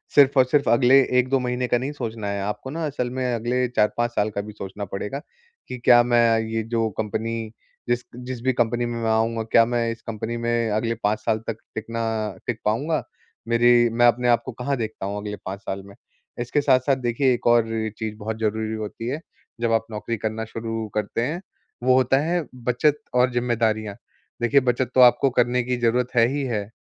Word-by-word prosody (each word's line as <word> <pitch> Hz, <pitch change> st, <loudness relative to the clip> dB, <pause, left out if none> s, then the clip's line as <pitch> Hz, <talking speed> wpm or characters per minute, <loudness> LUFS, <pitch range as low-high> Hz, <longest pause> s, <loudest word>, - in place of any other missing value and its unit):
सिर्फ़ 140 Hz, -1 st, +6 dB
और 130 Hz, -, +6 dB
सिर्फ़ 140 Hz, +3 st, +1 dB
अगले 125 Hz, +2 st, +5 dB, 0.2 s
1-2 130 Hz, +2 st, +2 dB
महीने 125 Hz, 0 st, -1 dB
का 120 Hz, -, +2 dB
नहीं 130 Hz, +4 st, -3 dB
सोचना 115 Hz, -7 st, -5 dB
है, 100 Hz, 0 st, -2 dB
आपको 105 Hz, +6 st, -4 dB
ना 160 Hz, +3 st, -3 dB
असल 135 Hz, -4 st, -2 dB
में 125 Hz, -1 st, 0 dB
अगले 120 Hz, +2 st, 0 dB
4-5 120 Hz, +1 st, +1 dB
साल 105 Hz, -2 st, 0 dB
का 100 Hz, -, 0 dB
भी 105 Hz, +1 st, -9 dB
सोचना 100 Hz, 0 st, -6 dB
पड़ेगा 105 Hz, +7 st, -5 dB, 0.5 s
कि, 125 Hz, -, -6 dB
"क्या 120 Hz, 0 st, +6 dB
मैं 120 Hz, -2 st, +3 dB
ये 110 Hz, 0 st, -2 dB
जो 115 Hz, 0 st, -1 dB
कंपनी, 110 Hz, +1 st, -3 dB, 0.4 s
जिस 120 Hz, 0 st, +1 dB
क -, -, -50 dB, 0.2 s
जिस 130 Hz, -2 st, -5 dB
भी 130 Hz, 0 st, +2 dB
कंपनी 120 Hz, 0 st, 0 dB
में 120 Hz, 0 st, -4 dB
मैं 115 Hz, -, 0 dB
आऊँगा, 115 Hz, +1 st, +1 dB
क्या 115 Hz, +1 st, +4 dB
मैं 120 Hz, 0 st, 0 dB
इस 115 Hz, -, -8 dB
कंपनी 115 Hz, +1 st, -4 dB
में 115 Hz, -1 st, 0 dB
अगले 115 Hz, +2 st, 0 dB
5 105 Hz, +1 st, +1 dB
साल 110 Hz, -1 st, 0 dB
तक 115 Hz, -, -3 dB, 0.2 s
टिकना 115 Hz, +1 st, -3 dB, 0.4 s
टिक 115 Hz, -3 st, -2 dB
पाऊँगा? 145 Hz, +9 st, 0 dB, 0.4 s
मेरी 120 Hz, 0 st, +5 dB
मैं 120 Hz, +1 st, +3 dB
अपने 120 Hz, +1 st, +2 dB
आप 120 Hz, -, +4 dB
को 130 Hz, -, -4 dB
कहाँ 125 Hz, +4 st, -2 dB
देखता 110 Hz, -4 st, -4 dB
हूँ 100 Hz, +1 st, -3 dB
अगले 105 Hz, 0 st, -5 dB
5 95 Hz, +1 st, -5 dB
साल 95 Hz, -1 st, -5 dB
में?" 100 Hz, 0 st, -14 dB, 0.4 s
इसके 120 Hz, +5 st, 0 dB
साथ-साथ, 135 Hz, -1 st, +3 dB
देखिए, 130 Hz, +1 st, +1 dB
एक 120 Hz, -, -3 dB
और 120 Hz, -1 st, +5 dB, 0.3 s
चीज़ 110 Hz, -1 st, -4 dB
बहुत 110 Hz, +1 st, -5 dB
ज़रूरी 110 Hz, 0 st, -1 dB
होती 110 Hz, +1 st, -5 dB
है, 140 Hz, +5 st, -2 dB, 0.4 s
जब 115 Hz, -1 st, +1 dB
आप 115 Hz, 0 st, +1 dB
नौकरी 110 Hz, +2 st, -3 dB
करना 110 Hz, +1 st, -3 dB
शुरू 115 Hz, 0 st, -4 dB
करते 105 Hz, +2 st, -1 dB
हैं, 155 Hz, +9 st, -2 dB, 0.4 s
वो 130 Hz, 0 st, +4 dB
होता 130 Hz, +1 st, +3 dB
है, 170 Hz, +1 st, 0 dB
बचत 125 Hz, +4 st, +1 dB, 0.2 s
और 125 Hz, +1 st, +4 dB
ज़िम्मेदारियाँ। 110 Hz, -4 st, 0 dB, 0.5 s
देखिए, 120 Hz, +4 st, +4 dB
बचत 125 Hz, -1 st, 0 dB
तो 130 Hz, -, +6 dB
आपको 125 Hz, +2 st, +6 dB
करने 125 Hz, 0 st, +1 dB
की 125 Hz, +1 st, -1 dB
जरूरत 120 Hz, +1 st, +1 dB
है 115 Hz, -1 st, +6 dB
ही 145 Hz, 0 st, -1 dB
है, 105 Hz, -5 st, -3 dB
120 Hz, 205 wpm, -23 LUFS, 110-125 Hz, 0.5 s, सिर्फ़